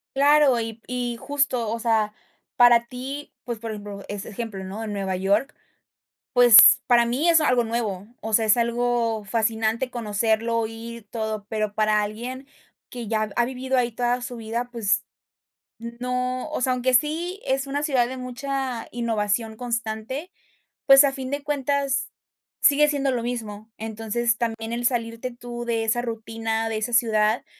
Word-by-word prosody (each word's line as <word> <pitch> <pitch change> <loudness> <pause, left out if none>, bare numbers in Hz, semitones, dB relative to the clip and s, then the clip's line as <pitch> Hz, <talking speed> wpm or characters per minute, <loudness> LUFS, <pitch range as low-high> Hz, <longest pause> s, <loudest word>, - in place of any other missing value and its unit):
Claro, 285 -3 +5
y 225 0 -5
y 245 -1 -2
justo, 275 -5 0
o 230 - -2
sea, 220 -2 +1 0.4
para 240 -1 +6
ti, 265 +4 -7
pues, 235 -3 -4
por 225 -1 -5
ejemplo, 205 -1 -7
ese 205 0 -5
ejemplo, 215 -2 -6
¿no?, 210 +4 -6
Nueva 195 -3 -3
York, 200 +9 0 0.8
pues, 245 -4 +8
para 235 -1 +5
mí 270 +8 0
es 330 -1 +6
algo 250 -5 +3
nuevo, 220 -4 -3
o 220 - -5
sea, 220 +1 +3
es 215 - +5
algo 235 -2 0
fascinante 225 +3 0
conocerlo, 225 0 0
ir, 230 0 -9
todo, 220 -2 -4
pero 215 -2 -2
para 215 0 +2
alguien 245 +6 -6 0.4
que 240 -3 -7
ya 215 -1 -1
ha 240 - +3
vivido 260 +1 -2
ahí 240 -1 +1
toda 245 +2 -1
su 245 0 -6
vida, 230 +2 -4
pues, 220 -4 0 0.7
no, 250 +3 -3
o 305 - -3
sea, 255 0 +2
aunque 255 +1 0
sí 325 - +1
es 270 +1 0
una 280 +1 -2
ciudad 265 -5 +2
de 260 +1 -6
mucha 255 -1 -4
innovación 220 -1 -1
constante, 235 +6 -4 0.6
pues, 270 +1 +9
a 275 - +2
fin 265 -1 -6
de 285 +1 -3
cuentas, 280 -1 -1 0.5
sigue 295 +1 +5
siendo 280 -2 0
lo 240 - -1
mismo. 220 -3 -5
Entonces, 225 +1 -2
también 225 -1 -3
el 240 +1 -1
salirte 230 0 -2
tú 240 0 -7
de 230 -1 0
esa 225 +2 +1
rutina, 225 -1 -3
de 220 - -2
esa 220 +3 -3
ciudad, 220 0 +2
235 Hz, 160 wpm, -24 LUFS, 220-255 Hz, 0.8 s, pues